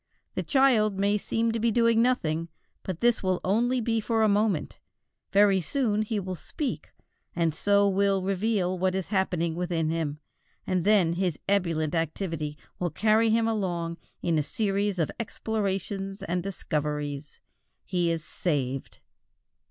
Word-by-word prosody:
The - - -1
child 235 -8 +3
may 200 +1 +2
seem 225 +3 0
to 225 - -2
be 230 +1 +2
doing 230 0 +3
nothing, 165 -10 +1 0.3
but 185 -3 -5
this 240 -1 +3
will 185 -2 0
only 240 +6 +2
be 225 -1 0
for 225 0 +1
a - - +5
moment; 205 -5 +1 0.5
very 200 -1 +5
soon 215 - 0
he 215 0 -1
will 185 -1 -4
speak, 260 - -4 0.5
and 165 -2 +1
so 200 +4 +3
will 195 -1 +2
reveal 190 -1 0
what 185 0 +1
is 190 -1 -3
happening 180 -4 0
within 170 -2 -1
him, 160 -3 -2 0.5
and 185 -2 0
then 200 -6 +4
his 180 -3 -1
ebullient 170 -6 +1
activity 165 -2 -2 0.2
will 175 - 0
carry 220 +7 +3
him 225 +1 +3
along 175 -6 -1 0.3
in 165 -3 +2
a - - +3
series 200 +4 -1
of 165 -3 0
explorations 195 -3 -3
and 180 -1 -1
discoveries. 150 -5 -3 0.5
He 175 -2 0
is 165 -2 -1
saved. 135 -6 -2
190 Hz, 150 wpm, -27 LUFS, 170-215 Hz, 0.5 s, a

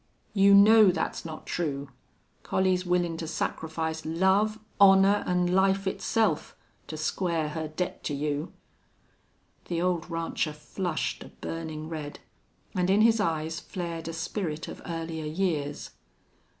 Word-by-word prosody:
"You 200 -1 +6
know 210 +1 +8
that's 180 - -2
not 160 -1 -7
true. 140 -5 -3 0.5
Collie's 185 -1 +1
willin' 175 -2 +1
to 165 - -5
sacrifice 160 0 -3
love, 190 +6 +2 0.2
honor, 195 +1 +6
an' 180 0 +1
life 195 +1 +3
itself, 200 -2 0 0.3
to 155 - -6
square 160 0 -1
her 160 +1 -4
debt 160 +4 -4
to 145 - -1
you." 150 +3 -2 1.1
The 170 -1 -2
old 175 -1 0
rancher 165 -2 -2
flushed 160 +2 -3
a - - -11
burning 160 -1 -6
red, 155 -3 -6 0.5
and 180 0 0
in 200 +2 +4
his 225 0 +5
eyes 160 -3 -1
flared 170 -3 -5
a 165 - -4
spirit 160 -1 -3
of - - -8
earlier 165 -2 -4
years. 150 -4 -2
170 Hz, 135 wpm, -28 LUFS, 160-190 Hz, 1.1 s, know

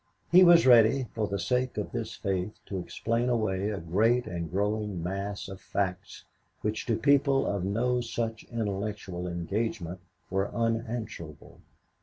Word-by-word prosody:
He 180 +2 +9
was 170 -3 +7
ready, 125 +1 +6
for 110 -2 -1
the 100 - -2
sake 125 +7 -1
of 105 - -3
this 115 -2 -4
faith, 95 0 -2
to 95 - -4
explain 115 +6 -1
away 105 -4 0
a 105 - -3
great 110 +9 +2
and 85 -2 -4
growing 105 -1 -1
mass 100 +3 -4
of 95 -1 -9
facts 95 0 -3 0.4
which 105 +1 -2
to 115 - +1
people 140 +2 +3
of 100 -3 -1
no 120 +6 +1
such 115 -1 -3
intellectual 100 -5 -3
engagement 90 +1 -3 0.3
were 95 +1 0
unanswerable. 115 - -3
105 Hz, 145 wpm, -28 LUFS, 95-115 Hz, 0.4 s, He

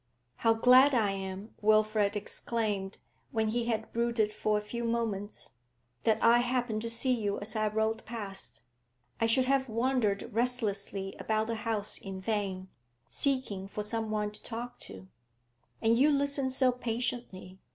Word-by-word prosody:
'How 225 -1 +3
glad 255 +4 +6
I 215 -4 +3
am,' 195 +2 -6
Wilfrid 215 -1 +3
exclaimed 205 -2 -2 0.3
when 220 -3 0
he 235 +1 0
had 225 -2 -2
brooded 230 -2 +1
for 210 0 +1
a - - -1
few 235 +3 -5
moments, 225 -3 -2 0.5
'that 220 -1 +4
I 235 +1 +7
happened 245 -3 0
to 230 - -3
see 235 +3 +2
you 205 -4 -1
as 215 +2 -6
I 215 0 +1
rode 220 +1 0
past! 205 -4 -6 0.6
I 225 - +3
should 255 +3 +3
have 270 -1 +1
wandered 230 -3 +1
restlessly 205 -5 0
about 220 0 0
the 230 0 -2
house 215 -1 -2
in 195 -1 -7
vain, 190 -2 -2 0.4
seeking 255 -9 -1
for 210 +1 -4
some 220 +1 -2
one 210 -1 -1
to 210 - -6
talk 240 +1 -6
to. 95 0 -10 0.8
And 225 +1 +5
you 275 +5 +5
listen 280 -2 +1
so 260 0 +3
patiently. 235 -6 -4
220 Hz, 155 wpm, -30 LUFS, 205-240 Hz, 0.8 s, I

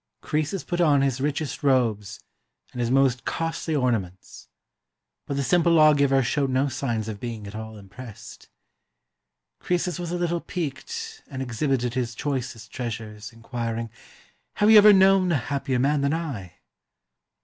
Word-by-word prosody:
Croesus 155 +5 -2
put 175 0 -2
on 145 -4 +4
his 135 -1 0
richest 145 +1 -2
robes 115 -7 +1 0.5
and 125 - -5
his 120 - 0
most 130 -2 +2
costly 165 -1 -2
orna 125 -5 +2
ments; 95 0 -12 0.8
but 140 - -3
the 140 - 0
simple 170 +3 +3
lawgiver 140 -4 +5
showed 135 +3 0
no 130 +2 +1
signs 115 -5 -2
of 105 -2 -5
being 115 -3 -6
at 100 - -9
all 110 0 -7
im.pressed. 105 +2 -12 1.1
Croesus 180 -1 -1
was 175 -1 -4
a 175 - -1
little 175 -1 -1
piqued 450 - -5
and 135 -1 -5
exhibited 125 0 -1
his 120 -2 -2
choicest 125 -5 -4
treasures, 110 -3 -6
inquiring, 115 -1 -5 0.7
''Have 210 +1 +5
you 215 - +10
ever 210 0 +8
known 190 -2 +5
a - - +3
hap 140 +2 -4
pier 130 -3 +1
man 140 +3 +2
than 140 +3 +1
I?" 125 - -5
135 Hz, 155 wpm, -25 LUFS, 115-160 Hz, 1.1 s, you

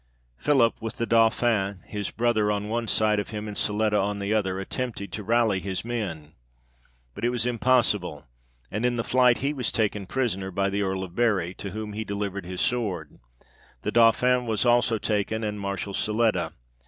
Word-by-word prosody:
Philip, 130 -6 +3
with 115 0 -5
the 115 - 0
Dauphin 115 -4 +2
his 105 -2 -4
brother 115 -3 +1
on 105 0 -2
one 115 +1 -1
side 105 -1 +2
of 100 - -4
him, 105 0 -5
and 105 - -6
Siletta 105 0 +1
on 100 +1 -1
the 100 +1 -1
other, 95 -3 0
attempted 100 -1 -4
to 105 - -5
rally 110 -2 +2
his 95 +2 -4
men, 90 -11 -4 0.8
but - - -9
it 120 - +3
was 120 -2 -1
impossible, 120 -5 +1 0.5
and 105 +3 -2
in 125 0 +2
the 115 - -1
flight 125 -1 +4
he 145 - +1
was 130 -5 -1
taken 105 -3 -1
prisoner 100 -6 -1
by 100 +1 0
the 100 +1 0
Earl 95 -1 -1
of 90 -2 -8
Bury, 100 -6 +1
to 100 - -6
whom 105 +1 -5
he 110 +1 -3
delivered 100 -3 -4
his 90 0 -3
sword: 105 - -1 0.6
the - - -1
Dauphin 120 +2 +4
was 110 +1 0
also 120 -1 +3
taken, 110 +1 -1
and 105 -1 -3
Marshal 100 0 -3
Siletta. 105 -6 0
105 Hz, 185 wpm, -26 LUFS, 100-115 Hz, 0.8 s, flight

